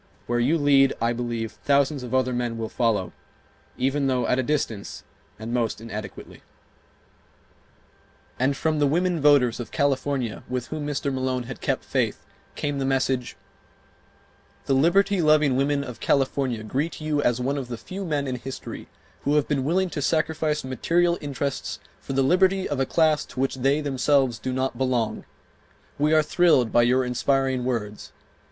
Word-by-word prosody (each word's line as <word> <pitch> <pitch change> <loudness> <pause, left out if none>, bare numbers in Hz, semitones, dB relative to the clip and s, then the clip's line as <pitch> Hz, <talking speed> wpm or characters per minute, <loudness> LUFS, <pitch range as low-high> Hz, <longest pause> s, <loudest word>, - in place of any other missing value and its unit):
Where 120 0 0
you 140 +8 +2
lead, 140 -2 +4
I 115 +1 +1
believe, 115 -2 -3
thousands 140 +4 +1
of 125 -2 -7
other 130 -1 +1
men 120 -1 -2
will 110 -1 -4
follow, 110 -6 0 0.6
even 135 +2 0
though 125 -2 +1
at 125 - +1
a - - +3
distance, 125 -7 -3 0.3
and 110 +3 -6
most 115 -4 0
inadequately... 105 -3 -8 1.0
." - - -34
And 135 +2 +1
from 155 -1 0
the 145 - +3
women 175 +2 +1
voters 135 -5 +4
of 120 - -5
California 135 -4 -1
with 125 -1 -3
whom 155 -2 -4
Mr. 140 -1 -2
Malone 130 -1 -1
had 125 +1 -8
kept - - -1
faith - - -1 0.3
came 145 -1 -2
the - - -1
message: 135 -2 0 1.3
"The 135 - +1
liberty 185 +7 +3
loving 155 -4 +4
women 140 +1 +1
of 125 -5 -8
California 135 -4 0
greet 140 +9 -2
you 155 -1 0
as 120 -3 +1
one 140 +3 -1
of 130 - -6
the 120 -1 -5
few 190 +10 -7
men 150 -5 -1
in 130 -2 -3
history 135 +2 -8 0.3
who 145 +2 +1
have 150 - +2
been 140 -3 0
willing 180 +5 +1
to 145 - -3
sacrifice 155 0 0
material 170 +7 +1
interests 140 -1 -3 0.2
for - - -6
the 135 0 +2
liberty 185 +5 +3
of 145 - -3
a 135 - +1
class 155 -3 +2
to - - -10
which 135 0 0
they 135 +4 +2
themselves 135 -3 +1
do 130 - -3
not 130 +1 -2
belong. 125 -4 -1 0.7
We 150 +1 +2
are 155 -1 +5
thrilled 150 -8 +3
by 120 - +5
your 125 +2 +3
inspiring 130 +1 0
words. 105 -5 -3
135 Hz, 170 wpm, -24 LUFS, 125-150 Hz, 1.3 s, are